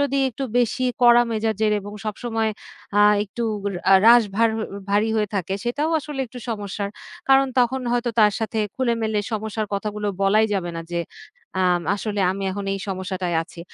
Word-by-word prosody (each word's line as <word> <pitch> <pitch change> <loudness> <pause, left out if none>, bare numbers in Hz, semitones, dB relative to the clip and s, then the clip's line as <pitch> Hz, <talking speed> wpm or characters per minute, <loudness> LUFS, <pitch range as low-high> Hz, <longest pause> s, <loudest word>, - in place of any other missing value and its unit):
যদি 275 -1 +1
একটু 270 +4 -5
বেশি 245 +2 +1 0.2
কড়া 240 0 +7
মেজাজের 220 -1 0
এবং 205 +1 -9
সবসময় 225 +1 -2 0.5
আ - - +6 0.2
একটু 235 +4 -6 0.2
উর 200 - -1 0.3
রাস 240 0 +8
ভার 230 +1 +4 0.4
ভারী 210 +2 +2
হয়ে 210 -2 +1
থাকে 190 0 -1
সেটাও 290 +7 -1
আসলে 290 -2 -6
একটু 245 +2 -10
সমস্যার 205 -2 -4 0.4
কারণ 270 0 +6
তখন 255 +2 +2
হয়তো 240 0 0
তার 210 -1 +5
সাথে 220 0 -3 0.2
খুলে-মেলে 230 -4 0
সমস্যার 215 0 -2
কথাগুলো 210 +1 -3 0.2
বলাই 215 +3 +4
যাবে 175 -3 -2
না। 165 - -4
যে 170 - 0 0.6
আম 180 -1 +3
"আসলে 205 0 -3
আমি 195 +1 -4
এখন 200 +1 -4
এই - - -4
সমস্যাটায় 185 -2 -2
আছি।" 170 +1 -13
215 Hz, 165 wpm, -22 LUFS, 200-240 Hz, 0.6 s, রাস